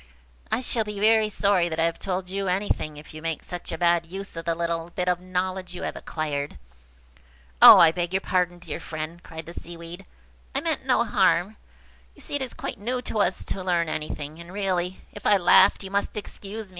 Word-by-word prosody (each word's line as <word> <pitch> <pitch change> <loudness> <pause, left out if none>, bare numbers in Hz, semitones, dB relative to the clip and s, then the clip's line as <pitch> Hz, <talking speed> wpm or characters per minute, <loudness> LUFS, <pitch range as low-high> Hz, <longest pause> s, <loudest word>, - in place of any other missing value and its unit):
"I 230 - +1
shall 235 -3 0
be 210 -1 -6
very 220 0 +4
sorry 200 -4 +2
that 160 0 -4
I - - +3
have 165 0 0
told 185 -1 -3
you 195 +1 -3
anything, 180 -5 -1
if 150 +1 -12
you 155 - -9
make 165 -1 -3
such 180 0 -7
a 165 - -3
bad 170 0 +3
use 195 +2 -7
of 165 0 -6
the 165 - 0
little 170 0 -2
bit 180 +1 -3
of 180 -1 +2
knowledge 185 0 -3
you - - -6
have - - -3
acquired." 145 -3 -4 1.0
"Oh, - - +12
I 165 -2 +8
beg 175 0 -2
your 190 0 0
pardon, 180 -2 0
dear 170 -3 -6
friend!" 155 +2 -6
cried 160 -2 -9
the 170 - -9
Seaweed. 170 +3 -9 0.5
"I 275 - +1
meant 310 -4 -2
no 250 - +4
harm. 190 -2 +2 0.6
You - - -16
see - - -8
it 285 - 0
is 260 -2 -4
quite - - -5
new 245 +5 -2
to 220 - -3
us - - 0
to 190 - -4
learn 170 -3 +1
anything; 155 0 -5
and, 170 +1 -10
really, 185 -2 -2
if 205 - -5
I 205 - +6
laughed, 190 +2 +6
you 190 - -8
must 200 +1 -1
excuse 210 +1 -6
me. - - -19
180 Hz, 220 wpm, -25 LUFS, 170-200 Hz, 1.0 s, Oh